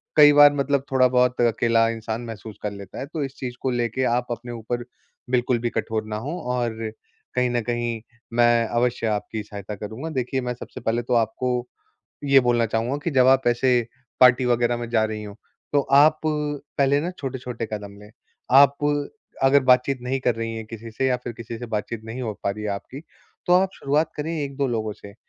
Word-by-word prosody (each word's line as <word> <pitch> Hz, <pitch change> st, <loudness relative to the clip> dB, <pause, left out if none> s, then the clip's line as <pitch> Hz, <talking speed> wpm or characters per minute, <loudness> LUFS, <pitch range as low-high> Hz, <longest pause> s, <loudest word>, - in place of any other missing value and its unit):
कई 145 Hz, -1 st, +8 dB
बार 145 Hz, 0 st, +8 dB
मतलब 140 Hz, -1 st, 0 dB
थोड़ा 130 Hz, -1 st, +5 dB
बहुत 125 Hz, 0 st, +2 dB
अकेला 115 Hz, -1 st, +3 dB
इंसान 115 Hz, 0 st, -4 dB
महसूस 110 Hz, -2 st, -8 dB
कर 105 Hz, -, -2 dB
लेता 100 Hz, -2 st, -9 dB
है -, -, -4 dB
तो 155 Hz, 0 st, -4 dB
इस 135 Hz, 0 st, -6 dB
चीज़ 125 Hz, -2 st, -5 dB
को 130 Hz, -, 0 dB
लेके 120 Hz, +1 st, -1 dB
आप 125 Hz, 0 st, -1 dB
अपने 120 Hz, +1 st, -5 dB
ऊपर 120 Hz, +1 st, -4 dB, 0.5 s
बिल्कुल 125 Hz, -1 st, +1 dB
भी 120 Hz, +1 st, -1 dB
कठोर 110 Hz, -2 st, -2 dB
ना 105 Hz, -, -4 dB
हों, 145 Hz, +11 st, -4 dB
और 120 Hz, -3 st, -2 dB, 0.4 s
कहीं 125 Hz, 0 st, +2 dB
न 120 Hz, 0 st, 0 dB
कहीं 120 Hz, -1 st, -2 dB, 0.3 s
मैं 120 Hz, 0 st, +4 dB
अवश्य 120 Hz, 0 st, 0 dB
आपकी 105 Hz, 0 st, -2 dB
सहायता 105 Hz, 0 st, -7 dB
करूँगा। 110 Hz, +10 st, -6 dB
देखिए 130 Hz, -2 st, -2 dB
मैं 125 Hz, -1 st, -2 dB
सबसे 120 Hz, -, -10 dB
पहले 115 Hz, +1 st, 0 dB
तो 120 Hz, -, -2 dB
आपको 120 Hz, +2 st, 0 dB, 0.6 s
ये 135 Hz, -1 st, +6 dB
बोलना 120 Hz, -2 st, +2 dB
चाहूँगा 115 Hz, +5 st, -1 dB
कि 170 Hz, -, 0 dB
जब 130 Hz, -3 st, +4 dB
आप 135 Hz, -1 st, +4 dB
ऐसे 120 Hz, +2 st, +2 dB, 0.5 s
पार्टी 125 Hz, 0 st, +6 dB
वग़ैरह 120 Hz, 0 st, +2 dB
में 120 Hz, -1 st, -5 dB
जा 110 Hz, -2 st, +3 dB
रही 110 Hz, -1 st, -4 dB
हों, 105 Hz, -1 st, -8 dB, 0.4 s
तो 145 Hz, -, +4 dB
आप 145 Hz, +3 st, +4 dB
पहले 145 Hz, -2 st, 0 dB
ना 170 Hz, +4 st, -2 dB
छोटे-छोटे 125 Hz, -4 st, -5 dB
कदम 100 Hz, -1 st, -6 dB
लें। 105 Hz, 0 st, -14 dB, 0.5 s
आप 140 Hz, 0 st, +7 dB, 0.7 s
अगर 135 Hz, +1 st, +6 dB
बातचीत 125 Hz, +2 st, +4 dB
नहीं 130 Hz, +2 st, -2 dB
कर 125 Hz, -2 st, +1 dB
रही 115 Hz, 0 st, -4 dB
हैं 110 Hz, -, -5 dB
किसी 115 Hz, +1 st, -9 dB
से 130 Hz, +4 st, -1 dB
या 130 Hz, -1 st, +2 dB
फिर 120 Hz, -, -4 dB
किसी 115 Hz, 0 st, -8 dB
से 120 Hz, -, -6 dB
बातचीत 110 Hz, 0 st, -4 dB
नहीं 115 Hz, +3 st, -6 dB
हो 110 Hz, -3 st, -2 dB
पा -, -, 0 dB
रही 105 Hz, +2 st, -6 dB
है 105 Hz, -, -1 dB
आपकी, 100 Hz, +7 st, -6 dB, 0.5 s
तो 175 Hz, -, +3 dB
आप 185 Hz, +1 st, +4 dB
शुरुआत 150 Hz, +3 st, 0 dB
करें 150 Hz, +2 st, -3 dB
1-2 140 Hz, -1 st, -2 dB
लोगों 110 Hz, -3 st, -2 dB
से 100 Hz, -1 st, -13 dB
120 Hz, 205 wpm, -23 LUFS, 115-135 Hz, 0.7 s, कई